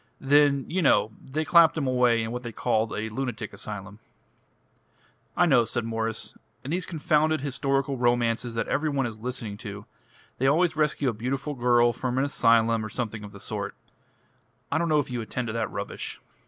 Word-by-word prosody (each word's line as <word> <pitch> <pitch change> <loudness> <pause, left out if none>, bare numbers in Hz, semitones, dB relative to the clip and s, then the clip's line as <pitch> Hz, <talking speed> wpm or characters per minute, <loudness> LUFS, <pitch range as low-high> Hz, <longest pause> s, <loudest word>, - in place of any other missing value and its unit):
Then, 140 0 +4
you 185 +3 -1
know, 125 -7 +3
they 155 +4 -3
clapped 170 -1 +6
'em 150 - 0
away 125 -3 +3
in 110 - -4
what 125 +1 -4
they 120 -1 -6
called 110 0 0
a 110 +1 -3
lunatic 115 -2 -4
asylum." 105 0 -7 1.4
"I 175 - +5
know," 135 -8 +5
said 115 0 -3
Mwres. 115 -1 -3 0.3
"In 140 - -5
these 180 +1 -1
confounded 155 -2 +1
historical 135 0 -1
romances 120 -1 +1
that 115 - -1
every 150 +3 0
one 140 -3 0
is 110 -2 -6
listening 115 -3 -5
to, 105 0 -8 0.5
they 135 - +2
always 165 +4 +3
rescue 150 -2 +1
a - - -2
beautiful 135 +6 -3
girl 120 -2 +3
from 125 +1 -3
an 135 - +3
asylum 115 -4 +3
or 110 - -5
something 110 -2 -4
of 105 - -9
the 100 - -12
sort. - - -4 1.0
I 160 - +2
don't 170 0 0
know 155 - +4
if 145 -2 -1
you 120 -1 -2
attend 115 +3 -4
to - - -3
that 115 -1 -1
rubbish." - - -5
125 Hz, 190 wpm, -26 LUFS, 115-145 Hz, 1.4 s, clapped